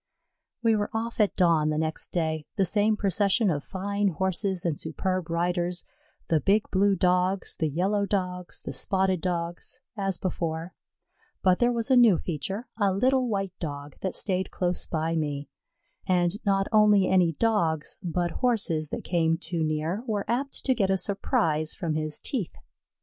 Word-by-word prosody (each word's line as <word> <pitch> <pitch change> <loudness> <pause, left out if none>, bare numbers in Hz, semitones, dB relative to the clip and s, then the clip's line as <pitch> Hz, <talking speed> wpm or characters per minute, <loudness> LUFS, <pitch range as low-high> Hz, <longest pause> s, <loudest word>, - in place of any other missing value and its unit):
We 225 -1 +4
were 205 -1 -1
off 230 +2 -3
at 210 -2 +3
dawn 165 -4 +3
the 155 - 0
next 155 0 -2
day 160 -3 -1
the 195 - +2
same 210 +4 +2
procession 200 +1 +2
of 145 -2 -2
fine 200 +1 -1
Horses 190 +1 -1
and 160 -4 -1
superb 185 +2 -2
riders; 175 +1 0 0.4
the 160 - +3
big 205 +2 +3
blue 200 +1 +3
Dogs, 180 +1 +2
the 160 - 0
yellow 200 +7 0
Dogs, 180 -3 -3
the 140 - -5
spotted 190 +5 +1
Dogs, 175 +6 -3 0.2
as 195 -3 -1
before; 170 -1 -3 0.7
but 185 -1 +4
there 240 0 +3
was 235 +2 -1
a - - +7
new 235 -7 +6
feature, 190 - -4
a 200 -2 +3
little 255 +6 +2
white 195 -4 -2
Dog 145 -3 -6
that 190 - -2
stayed 190 -2 -1
close 180 -1 -1
by 165 0 -1
me, 145 -3 -2 0.6
and 180 +2 +1
not 195 -1 +2
only 210 -2 +5
any 180 -3 +3
Dogs, 165 -7 0
but 175 -1 -1
Horses 195 - +1
that - - -5
came 165 -2 +1
too 165 -1 -2
near 155 +6 -1
were 210 -3 -1
apt 270 +4 -2
to 260 - +4
get 200 -6 +1
a 190 - +3
surprise 160 -6 0
from 170 -5 -2
his 155 -1 -2
teeth. 240 - -4
185 Hz, 165 wpm, -27 LUFS, 165-205 Hz, 0.7 s, a